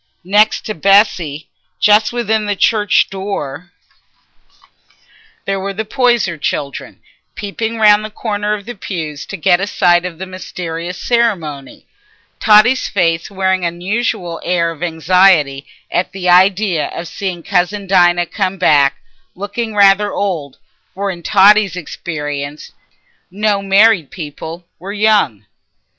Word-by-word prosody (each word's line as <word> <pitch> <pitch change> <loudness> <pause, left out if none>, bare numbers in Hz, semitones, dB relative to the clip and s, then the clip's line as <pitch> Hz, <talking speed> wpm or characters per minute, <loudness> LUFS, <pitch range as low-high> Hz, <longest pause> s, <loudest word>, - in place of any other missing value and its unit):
Next 210 +3 +3
to 215 - -3
Bessy, 175 -5 +2 0.3
just 210 0 +4
within 220 -3 -1
the 205 - 0
church 210 0 +2
door, 180 -4 -5 1.7
there 195 0 -2
were 195 +1 -5
the 220 +2 -3
Poyser 235 - +1
children, 140 -1 -4 0.3
peeping 225 +3 -4
round 210 -1 +5
the 215 - -6
corner 210 -1 -2
of 200 -2 -10
the 240 - -6
pews 160 -8 -6
to 200 - -6
get 175 +2 +2
a 200 - -1
sight 175 -3 +2
of 180 -2 -6
the 190 - -6
mysterious 180 -2 -6
ceremony; 170 - -2 0.5
Totty's 220 +5 +4
face 165 -4 0
wearing 190 -1 -1
an 170 0 -2
unusual 180 -2 -3
air 170 -1 0
of 165 -1 -12
anxiety 165 -4 +2 0.2
at 180 - -1
the 190 -2 -4
idea 185 -1 +3
of 170 - -7
seeing 180 -1 -5
cousin 195 +2 -1
Dinah 175 -2 +3
come 190 +1 -3
back 140 -6 +3 0.4
looking 205 +3 -5
rather 200 0 +4
old, 165 -9 -3 0.4
for 200 +1 -2
in 175 -2 -9
Totty's 205 +1 +4
experience 150 -4 -6 0.6
no 205 +1 0
married 195 -4 +3
people 165 +1 -8
were 195 +4 -7
young. 205 - +1
190 Hz, 130 wpm, -16 LUFS, 170-210 Hz, 1.7 s, round